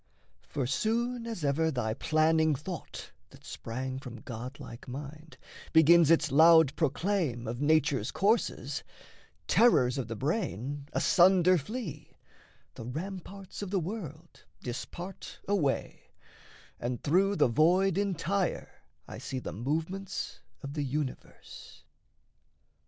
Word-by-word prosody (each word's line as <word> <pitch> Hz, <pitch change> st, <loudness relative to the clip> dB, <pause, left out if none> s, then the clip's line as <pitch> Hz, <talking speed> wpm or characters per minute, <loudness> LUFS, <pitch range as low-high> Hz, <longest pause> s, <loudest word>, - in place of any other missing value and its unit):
For 140 Hz, -4 st, -3 dB
soon 230 Hz, -, -1 dB
as 220 Hz, -10 st, -4 dB
ever 155 Hz, +3 st, +2 dB
thy 120 Hz, -7 st, -1 dB
planning 155 Hz, +3 st, +2 dB
thought 160 Hz, +4 st, -7 dB, 0.2 s
that -, -, -17 dB
sprang 130 Hz, +3 st, -5 dB
From 125 Hz, -3 st, -9 dB
god 125 Hz, +4 st, -7 dB
like 115 Hz, -, -10 dB
mind 150 Hz, +4 st, -8 dB, 0.4 s
begins 160 Hz, 0 st, +7 dB
its 165 Hz, -4 st, +3 dB
loud 160 Hz, 0 st, +6 dB
proclaim 155 Hz, -, 0 dB
Of 120 Hz, +3 st, -4 dB
nature's 145 Hz, -6 st, +2 dB
courses, 215 Hz, +4 st, 0 dB, 0.6 s
terrors 135 Hz, -, +4 dB
of 125 Hz, -, -3 dB
the 115 Hz, -, -5 dB
brain 140 Hz, -, -3 dB
Asunder 185 Hz, 0 st, +5 dB
flee, 160 Hz, -, -7 dB, 0.6 s
the 115 Hz, -, -9 dB
ramparts 190 Hz, +7 st, -7 dB
of 200 Hz, -, -4 dB
the 195 Hz, 0 st, +1 dB
world 170 Hz, -3 st, -7 dB, 0.2 s
Dispart 175 Hz, +9 st, -7 dB
away, 175 Hz, -10 st, -1 dB, 0.7 s
and 120 Hz, 0 st, -4 dB
through 190 Hz, +6 st, +3 dB
the -, -, +4 dB
void 175 Hz, +9 st, +3 dB
entire 195 Hz, -1 st, -1 dB, 0.3 s
I -, -, -8 dB
see 135 Hz, -, -5 dB
the 130 Hz, -, -5 dB
movements 165 Hz, -, -3 dB, 0.2 s
of 140 Hz, 0 st, -6 dB
the 145 Hz, -1 st, -2 dB
universe. 140 Hz, 0 st, -6 dB
155 Hz, 120 wpm, -30 LUFS, 135-190 Hz, 0.7 s, begins